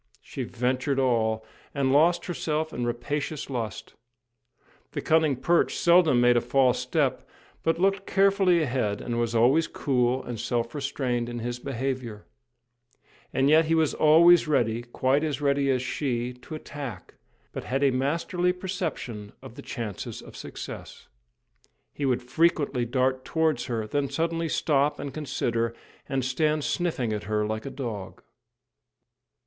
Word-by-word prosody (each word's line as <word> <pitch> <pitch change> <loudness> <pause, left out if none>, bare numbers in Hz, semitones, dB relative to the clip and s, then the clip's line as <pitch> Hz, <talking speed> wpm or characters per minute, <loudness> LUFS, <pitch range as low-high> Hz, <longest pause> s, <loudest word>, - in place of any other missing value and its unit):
She - - -6
ventured 130 +3 -1
all, 110 -4 +1 0.3
and 135 -1 +1
lost 165 +5 +4
herself 155 -3 -2
in 120 -1 -2
rapacious 145 +5 -3
lust. 110 -8 -4 1.0
The - - -3
cunning 155 -3 +3
perch 170 +7 +1
seldom 170 -7 +5
made 120 0 +5
a 120 - +3
false 130 -3 +2
step, - - 0 0.4
but 165 0 +1
looked 195 +2 +1
carefully 195 -3 +3
ahead, 125 -7 -1
and 120 -1 -3
was 120 0 -1
always 130 +8 +4
cool 125 -2 0
and 120 -3 -6
self 120 0 -2
restrained 130 -4 -2
in 120 - -5
his 120 +1 -4
behaviour; 130 -4 -4 1.1
and 135 +1 +2
yet 160 +2 +5
he 165 +1 +2
was 160 -2 +2
always 170 +2 +6
ready 120 -6 +1
quite 130 +4 0
as 150 -3 -1
ready 140 -1 +1
as 130 -1 +1
she 125 -3 -2
to 125 +5 -10
attack, 140 - -8 0.4
but - - -6
had 135 +2 -1
a 140 - +4
masterly 165 +7 0
perception 130 - -5
of - - -10
the - - -10
chances 115 -7 -5
of - - -12
success. - - -9 0.8
He 140 - -2
would 125 -1 0
frequently 145 -3 +1
dart 130 +1 0
towards 160 0 0
her, 115 -4 -2
then 140 +5 -1
suddenly 165 0 -1
stop 145 -2 +1
and 140 - -5
consider, 115 -6 -2 0.3
and 135 -2 -1
stand 150 +3 +1
sniffing 145 - -1
at 105 - -4
her 105 +1 0
like 110 +3 -3
a - - -3
dog. 110 -9 -6
135 Hz, 150 wpm, -26 LUFS, 120-155 Hz, 1.1 s, always